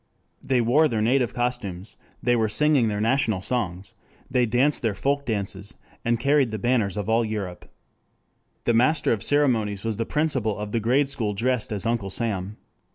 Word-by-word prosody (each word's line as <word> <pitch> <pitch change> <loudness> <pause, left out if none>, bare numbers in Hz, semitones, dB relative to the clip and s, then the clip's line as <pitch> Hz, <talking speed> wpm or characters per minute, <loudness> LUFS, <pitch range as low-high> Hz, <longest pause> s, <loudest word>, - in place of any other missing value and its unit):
They 130 -2 +2
wore 135 +7 +4
their 115 -6 -2
native 125 -1 +2
costumes, 115 -6 -3 0.3
they 120 -1 +3
were 110 -2 +1
singing 145 +1 +3
their 105 -1 -1
national 110 -4 +1
songs; 95 -7 -2 0.4
they 125 -2 +2
danced 130 +6 +2
their 110 -4 0
folk 140 +5 -1
dances, 100 0 -3 0.3
and 115 0 +1
carried 140 0 +3
the 110 - -4
banners 110 -3 0
of 105 - -3
all 115 +1 +3
Europe. 105 -5 -5 0.9
The 120 - +2
master 145 +7 +3
of 105 - -3
ceremonies 115 -9 +1
was 110 -2 -2
the 115 - -2
principal 135 -9 0
of 105 0 -5
the 115 - 0
grade 130 +6 +2
school 110 -7 -2
dressed 125 +2 0
as 100 -3 -3
Uncle 115 -4 -1
Sam. 100 -2 -3
115 Hz, 175 wpm, -24 LUFS, 105-130 Hz, 0.9 s, wore